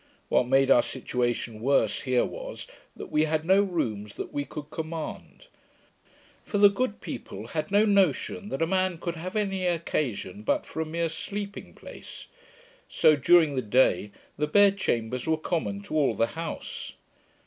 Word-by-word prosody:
What 125 - +3
made 135 +1 +4
our 120 - +7
situation 120 -3 -2
worse 125 -4 +2
here 130 -2 +2
was, - - -7 0.3
that - - -9
we 155 +1 +3
had 155 0 -1
no 190 +3 +5
rooms 110 - -2
that - - -6
we 145 0 -2
could 150 0 -8
command; 160 0 -6 1.0
for 205 - -3
the 205 0 +7
good 210 0 -2
people 100 +3 -7
had 155 -1 -3
no 205 +2 +4
notion 200 - +1
that 135 - -1
a - - +3
man 185 0 0
could 170 +1 -4
have 180 +4 -6
any 195 -3 0
occasion 140 - -2
but 105 - 0
for 160 - -5
a 160 - -3
mere 165 +1 -1
sleeping 200 +5 -6
place; - - -11 0.6
so, 155 - +5
during 160 +1 +5
the 130 - 0
day, 110 -2 +2 0.3
the 150 - +1
bed 200 +4 +4
chambers 120 -2 -1
were 160 0 +2
common 175 +5 -2
to 200 - -9
all 140 -7 +2
the 115 - +3
house. 165 0 -6
160 Hz, 170 wpm, -27 LUFS, 130-190 Hz, 1.0 s, our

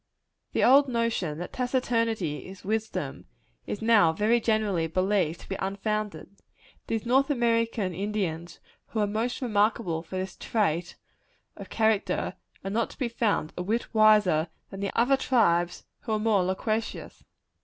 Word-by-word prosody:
The - - +1
old 275 +3 +6
notion, 230 - -1
that 175 - -7
taciturnity 230 - -1
is 190 0 -12
wisdom, 220 +2 -3 0.4
is 210 - -4
now 215 -8 +5
very 215 +8 +2
generally 210 -7 +1
believed 185 -1 0
to - - -14
be 195 - -3
unfounded. 200 +1 -3 0.5
These 225 0 -2
North 265 +4 +3
American 230 -6 +1
Indians 175 -3 -3 0.3
who 220 - -4
are 210 - +3
most 225 +5 -2
remarkable 210 -6 +1
for 170 +3 -9
this 190 0 -4
trait 175 -6 -1 0.6
of - - -10
character, 220 -2 +1 0.3
are 195 - -4
not 230 +3 -1 0.2
found 210 -9 +1
to - - -23
be - - -2
a - - -3
whit 225 +6 -2
wiser 210 -7 +5 0.2
than 195 0 -3
other 255 +4 +4
tribes 175 -10 +1
who 225 - -4
are 215 - +1
more 210 -3 +2
loquacious. 215 +5 -3
210 Hz, 145 wpm, -27 LUFS, 185-230 Hz, 0.6 s, old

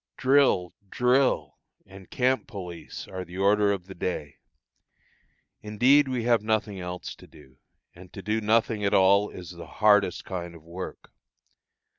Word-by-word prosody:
Drill! 130 -10 +3 0.2
drill! 125 +4 +1 0.3
and 95 0 -14
camp 130 +1 0
police 90 -7 -8
are 95 -1 -6
the 90 +1 -11
order 100 +1 +3
of 95 -3 -3
the 95 - -10
day. 80 -5 -4 1.2
Indeed 125 +7 +3
we 125 -3 -2
have 120 -2 +3
nothing 110 -2 -1
else 90 0 -6
to - - -16
do, 65 0 -19 0.3
and 90 0 -15
to 100 - -9
do 110 +1 -1
nothing 110 0 +1
at 100 +1 +2
all 100 +2 +4
is 90 -1 -10
the 85 -1 -10
hardest 105 -4 +2
kind 85 -2 -6
of 80 - -15
work. 85 +3 -9
100 Hz, 150 wpm, -26 LUFS, 90-110 Hz, 1.2 s, all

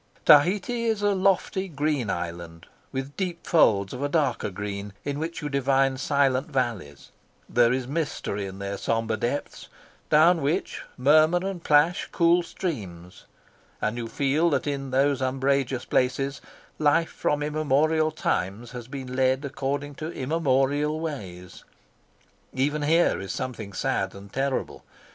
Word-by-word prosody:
Tahiti 200 +10 +4
is 220 -2 0
a 205 0 +3
lofty 190 0 +1
green 145 - -1
island, 85 -2 -5 0.3
with 135 +2 -5
deep 180 -3 -4
folds 100 - +3
of 125 - -6
a 145 - 0
darker 145 -8 0
green, 100 +1 -5
in 145 0 -2
which 160 +1 -4
you - - -1
divine 135 -1 +2
silent 135 -1 +1
valleys; 115 - -3 0.4
there 120 -1 +3
is 130 0 -1
mystery 135 -9 -3
in 95 0 -9
their 100 0 -4
sombre 115 -1 0
depths, 120 +6 -4 0.4
down 165 +2 +5
which 145 +4 -1 0.2
murmur 155 +6 +5
and 185 -4 -5
plash 150 +4 +3
cool 170 0 +4
streams, 100 - -6 0.5
and 110 +1 -1
you 120 -1 -4
feel 145 +7 +1
that 150 - 0
in 140 -2 -3
those 135 +1 +2
umbrageous 130 -1 0
places 135 +2 0 0.4
life 155 +2 +3
from 145 0 -1
immemorial 155 +1 +2
times 115 - -2
has 120 -3 -8
been 130 -2 -6
led 130 +2 +2
according 140 +1 -3
to 155 +3 -6
immemorial 145 +1 0
ways. 95 - -7 0.9
Even 145 +3 0
here 165 +4 +3
is 95 - -5
something 120 -6 -5
sad 95 - -1
and 100 0 -12
terrible. 135 0 -2
140 Hz, 140 wpm, -25 LUFS, 120-155 Hz, 0.9 s, down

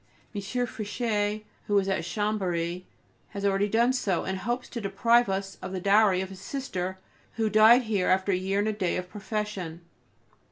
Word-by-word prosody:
M. 205 - -3
Fichet, 215 -1 -2 0.2
who 205 - +3
is 195 -1 +2
at 190 -4 0
Chambery, 180 -3 -2 0.5
has 200 0 -3
already 200 +1 +2
done 235 +4 +3
so, 195 -8 0
and 190 0 -3
hopes 240 +6 -2
to 235 - -5
deprive 230 +3 +3
us 195 0 -3
of 185 - -6
the 185 - -2
dowry 200 0 +4
of 190 - -5
his 190 -1 -11
sister, 190 -6 -4 0.4
who 220 -2 0
died 220 +4 +7
here 205 -5 0
after 190 +1 +2
a - - +3
year 190 +2 -1
and 205 +1 +1
a 215 - 0
day 190 -4 -1
of 180 0 -4
profession. 205 -5 -4
200 Hz, 185 wpm, -27 LUFS, 190-220 Hz, 0.5 s, died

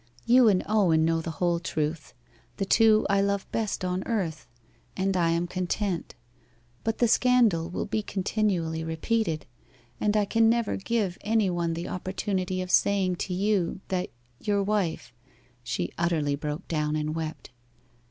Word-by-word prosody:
You 245 0 +6
and 195 -4 +3
Owen 180 -7 +3
know 165 0 +1
the 165 - -5
whole 175 -1 +1
truth 155 -2 -3 0.4
the 195 - -1
two 220 +1 +5
I 200 0 +3
love 200 0 0
best 215 -4 -2
on 180 +1 -1
earth 180 -9 -2 0.5
and 190 0 0
I 170 -2 +2
am 170 +1 +1
content. 180 -1 -2 0.7
But 225 0 -1
the 240 - +3
scandal 230 -9 +3
will 180 - -3
be 215 +1 -1
continually 185 -5 -1
repeated, 160 +1 -1 0.5
and 210 0 +1
I 210 - +3
can 225 +2 +3
never 235 -2 +1
give 200 -3 -1
any 215 -3 +1
one 170 -1 -1
the 170 +1 -4
opportunity 185 0 -2
of 180 - -6
saying 190 -3 +3
to 185 - -3
you 190 -2 0
that 185 -1 -1 0.3
your 205 -1 0
wife....' 180 -11 -1 0.5
She 90 -6 -3
utterly 160 -4 +1
broke 150 +1 -5
down 150 -2 -1
and 155 0 -1
wept. 160 -4 -5
185 Hz, 155 wpm, -27 LUFS, 165-210 Hz, 0.7 s, You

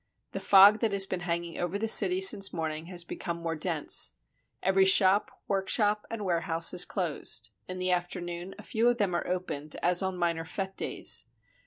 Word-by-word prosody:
The - - -5
fog 200 +2 +6
that 225 -3 -1
has 195 -1 +4
been 185 -1 -4
hanging 170 -1 -4
over 175 +3 -3
the 225 +2 -3
city 190 -4 +5
since 195 +1 +5
morning 160 -1 -5
has 175 -1 -4
become 170 0 -6
more 165 -1 -4
dense. 160 -1 0 0.5
Every 190 +1 +3
shop, 190 +1 +4 0.2
workshop, 205 +2 0
and 225 -3 -6
warehouse 165 -2 0
is 180 0 +4
closed; 140 - -2 0.2
in 185 - -6
the 185 0 -1
afternoon 175 0 -4
a - - -12
few 235 0 0
of 240 - -1
them 200 -5 -1
are 175 - -3
opened, 155 -5 -4
as 180 +1 +3
on 190 -1 -3
minor 170 -2 -2
fete 190 +5 -6
days. - - -1
180 Hz, 185 wpm, -28 LUFS, 170-195 Hz, 0.5 s, fog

